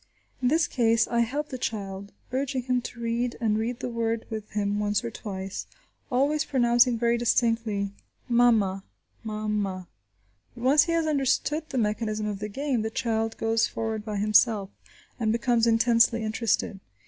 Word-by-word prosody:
In 250 - +2
this 315 +5 +3
case 230 -2 +2
I 235 - 0
help 280 +6 -1
the 255 - -6
child, 200 -3 -4 0.2
urging 260 0 -1
him 250 0 0
to 240 - -8
read, 235 +1 -1
and 220 -3 +1
reading 235 +2 -2
the - - -3
word 230 -1 -2
with 215 -1 -5
him 205 0 0
once 205 0 0
or 235 - -4
twice, 195 -3 -6 0.4
always 285 +5 +2
pronouncing 240 -3 +3
very 235 0 +1
distinctly, 230 -4 +1 0.4
mama, 225 -6 +3 0.4
mama. 210 -4 -3 0.7
But 240 - -9
once 285 +3 +6
he 335 - -1
has 330 -1 +1
understood 300 +1 0
the - - -3
mechanism 215 -1 -1
of 205 -2 -3
the 210 +1 -4
game, 270 +1 -1
the 220 - -2
child 225 -2 -1
goes 225 0 +1
forward 220 -1 -3
by 210 -1 -4
himself, 210 -1 +3 0.5
and 220 -2 +1
becomes 235 0 +2
intensely 230 0 +4
interested. 215 -2 -1
230 Hz, 160 wpm, -26 LUFS, 215-245 Hz, 0.7 s, once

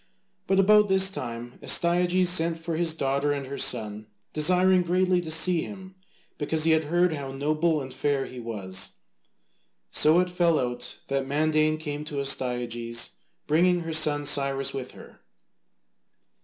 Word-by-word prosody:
But 190 0 +2
about 210 +2 +5
this 190 0 +3
time, 120 -7 -7
Astyages 180 +1 +2
sent 170 -2 +2
for 165 0 -5
his 165 -1 -1
daughter 140 0 -1
and 140 -1 -3
her 140 +1 -7
son, 110 -3 -1 0.3
desiring 180 +4 +3
greatly 180 +1 +1
to 165 - -8
see 165 +1 +3
him 190 0 -9 0.5
because 155 +1 0
he 165 - +3
had 160 -1 +2
heard 175 +2 +1
how 140 -3 -6
noble 155 +3 0
and 130 -1 -8
fair 135 0 -1
he 125 - -10
was. 100 -5 -4 1.0
So 155 +3 +4
it 180 0 0
fell 170 -2 +2
out 125 -1 -4
that 135 -1 -2
Mandane 155 +2 +1
came 150 -1 -5
to 145 -2 -5
Astyages, 120 -3 -1 0.3
bringing 175 +3 +2
her 165 -1 -5
son 150 -2 +3
Cyrus 140 -1 0
with 130 -1 -6
her. - - -15
155 Hz, 155 wpm, -25 LUFS, 135-175 Hz, 1.0 s, about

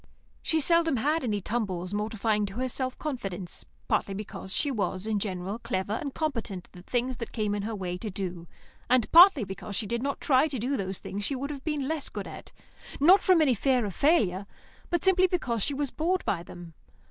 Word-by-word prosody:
She 320 - +1
seldom 330 0 +3
had 300 +7 +1
any 210 -4 -1
tumbles 190 -4 -2
mortifying 210 0 0
to 195 - -9
her 255 +2 -1
self 255 +1 -3
confidence, 195 - -5 0.2
partly 195 - 0
because 195 -1 -7
she 285 +7 0
was 195 -4 -1
in 220 -2 0
general 195 +1 -3
clever 190 -2 -2
and 280 +5 -3
competent 230 - -3
at - - -34
the 180 - -12
things 245 +5 -1
that 230 - -6
came 210 -3 -1
in 205 - -1
her 220 +2 -3
way 180 -2 -4
to 215 - -4
do, 180 -3 -5 0.4
and 250 -3 +3
partly 340 - +9
because 195 +1 -6
she 220 - -1
did 235 +3 -2
not 280 +1 -2
try 270 +2 +4
to 275 -4 -4
do 250 +5 -1
those 190 -4 -4 0.2
she 205 +7 -1
would 280 +3 -3
have 275 -2 -7
been 300 -4 -1
less 315 -2 -1
good - - -5
at, - - -10 0.5
not 355 +8 +7
from 370 -4 +5
any 280 -5 +4
fear 250 +1 +2
of 200 - -4
failure, 205 - +2 0.4
but 345 -2 0
simply 375 -1 +5
because 255 - -1
she 280 - 0
was 280 -1 -2
bored 360 +4 0
by 175 - 0
them. 175 -1 -11
230 Hz, 210 wpm, -28 LUFS, 195-285 Hz, 0.5 s, partly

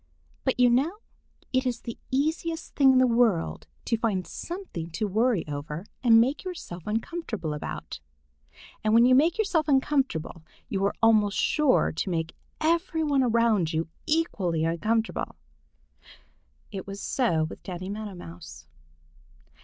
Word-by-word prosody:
But 260 -2 0
you 245 -1 +6
know 290 - +2 0.6
it 260 0 +3
is 240 -2 -2
the 235 - -7
easiest 320 +4 -1
thing 270 -2 +6
in - - +4
the 255 - +6
world 230 -8 +1 0.2
to 230 - 0
find 200 -6 0
something 340 - -6
to 210 +6 -2
worry 220 -2 +1
over 150 +4 -5 0.2
and 225 -2 +7
make 260 +6 +1
yourself 270 - -7
uncomfortable 220 - -3
about. 150 - -6 0.8
And 215 +1 +3
when 235 +1 +7
you 255 - +5
make 315 +6 +4
yourself 380 -8 +1
uncomfortable, 265 - +1 0.3
you 195 -1 -1
are 200 - 0
almost 215 -3 +4
sure 300 -4 +3
to 165 - -3
make 165 -2 -2 0.2
every 330 0 +1
one 285 -3 +2
around 230 -8 +2
you 160 +1 -1 0.2
equally 190 - 0
uncomfortable. 215 +7 -1 1.4
It 195 -2 -6
was 200 0 -6
so 200 -13 +1
with 155 - -6
Danny 185 -1 -6
Meadow 210 -2 -6
Mouse. 80 - -11
225 Hz, 145 wpm, -27 LUFS, 175-270 Hz, 1.4 s, and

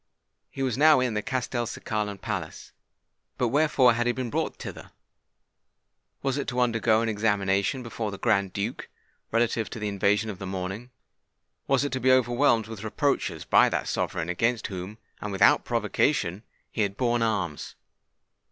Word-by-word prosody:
He 135 - -4
was 130 -1 -1
now 155 -1 +7
in 125 -3 0
the 105 - -1
Castelcicalan 110 -5 -3
palace. - - -5 0.7
But 125 - +1
wherefore 140 -3 +4
had 120 +1 0
he - - +4
been 125 -2 -4
brought - - -1
thither? - - -9 1.3
Was 135 0 0
it - - -3
to 125 -1 -2
undergo 115 -2 +2
an - - -1
examination 105 +2 0
before 115 -2 -4
the 100 - -6
Grand 100 -1 +1
Duke, 105 +6 -4 0.4
relative 115 -1 +1
to - - -7
the 105 -1 -3
invasion 100 +2 +1
of 95 - -10
the 95 - -5
morning? 95 +5 -5 0.8
was 135 0 +3
it 145 - -3
to 130 - -1
be 130 0 +3
overwhelmed 120 -2 +3
with 110 -1 -8
reproaches 110 +6 -1
by - - +5
that - - -2
sovereign 80 - -2
against 115 +6 0
whom, 95 +2 -6 0.2
and 105 - -4
without 95 - +4
provocation, 90 +4 0 0.3
he 110 - -2
had 100 -1 -1
borne 120 -2 +1
arms? 95 -9 -2
115 Hz, 160 wpm, -26 LUFS, 100-125 Hz, 1.3 s, now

